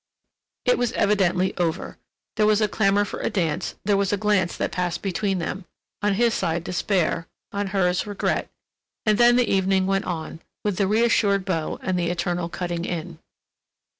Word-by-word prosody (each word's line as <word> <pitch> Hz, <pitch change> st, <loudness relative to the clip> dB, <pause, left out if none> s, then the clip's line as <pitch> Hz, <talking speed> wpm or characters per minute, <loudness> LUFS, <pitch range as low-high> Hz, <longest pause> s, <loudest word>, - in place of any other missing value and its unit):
It 250 Hz, -, +3 dB
was 245 Hz, -1 st, 0 dB
evidently 190 Hz, -3 st, +2 dB
over. 170 Hz, -2 st, -2 dB, 0.4 s
There 215 Hz, -1 st, +3 dB
was 215 Hz, 0 st, +4 dB
a 215 Hz, -, +3 dB
clamor 205 Hz, 0 st, +2 dB
for -, -, -6 dB
a -, -, -1 dB
dance, 165 Hz, -6 st, -1 dB
there 205 Hz, 0 st, +3 dB
was 200 Hz, -1 st, +1 dB
a 205 Hz, -, +1 dB
glance 200 Hz, -3 st, +1 dB
that -, -, -1 dB
passed 175 Hz, -2 st, -2 dB
between 195 Hz, 0 st, 0 dB
them—on 195 Hz, +3 st, -4 dB
his 235 Hz, +2 st, +3 dB
side 170 Hz, -2 st, -1 dB
despair, 180 Hz, -2 st, 0 dB, 0.2 s
on 200 Hz, -1 st, -2 dB
hers 190 Hz, -1 st, +1 dB
regret, 205 Hz, -1 st, -1 dB, 0.6 s
and 215 Hz, 0 st, +3 dB
then 240 Hz, 0 st, +6 dB
the 245 Hz, -2 st, +3 dB
evening 190 Hz, 0 st, +2 dB
went 195 Hz, +1 st, 0 dB
on, 160 Hz, -2 st, -4 dB, 0.2 s
with 205 Hz, -3 st, -1 dB
the 195 Hz, -, +2 dB
reassured 210 Hz, -3 st, +2 dB
beaux 165 Hz, -5 st, -2 dB
and 185 Hz, -1 st, 0 dB
the 170 Hz, -1 st, 0 dB
eternal 175 Hz, 0 st, -1 dB
cutting 175 Hz, -1 st, -3 dB
in. 170 Hz, -1 st, -5 dB
190 Hz, 170 wpm, -24 LUFS, 175-205 Hz, 0.6 s, then